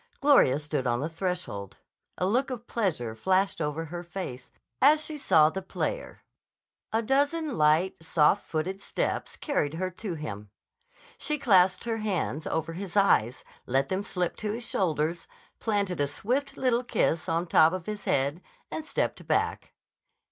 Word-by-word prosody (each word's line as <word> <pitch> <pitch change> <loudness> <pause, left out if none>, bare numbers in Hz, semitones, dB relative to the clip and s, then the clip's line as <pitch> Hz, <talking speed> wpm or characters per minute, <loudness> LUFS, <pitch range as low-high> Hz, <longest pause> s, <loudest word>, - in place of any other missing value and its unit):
Gloria 275 - +5
stood 145 -3 -2
on 120 0 +1
the 155 - -2
threshold. 165 - -4 0.4
A 180 - 0
look 250 +8 +1
of 245 -3 -6
pleasure 165 - -1
flashed 190 - +1
over 150 +2 -2
her 175 +2 -6
face 175 -8 -7 0.3
as 300 +3 +5
she 310 - -4
saw 155 - +4
the 190 - -4
player. - - -4 0.7
A 225 +1 +1
dozen 285 +4 +1
light, 155 +3 +2
soft 160 -2 +3
footed 185 +5 -2
steps - - -2
carried 160 - -1
her 185 +2 -2
to 185 0 -5
him. 105 -9 -6 0.7
She 300 - 0
clasped 190 -8 +4
her 230 -1 -2
hands 185 -7 -2
over 160 +1 -2
his 190 +2 -5
eyes, 125 - +3 0.2
let 135 +2 +1
them 190 +1 0
slip 180 -3 -2
to 210 -1 -2
his 235 +1 -4
shoulders, 165 -3 0 0.3
planted 200 -7 0
a 145 - +2
swift, 250 - -2
little 250 -2 +1
kiss 165 -8 0
on 165 +1 +1
the 175 - -12
top 160 +1 +6
of 185 -2 -4
his 210 -2 -5
head, 140 +5 +1 0.3
and 320 - -4
stepped - - -2
back. - - 0
180 Hz, 160 wpm, -28 LUFS, 155-220 Hz, 0.7 s, top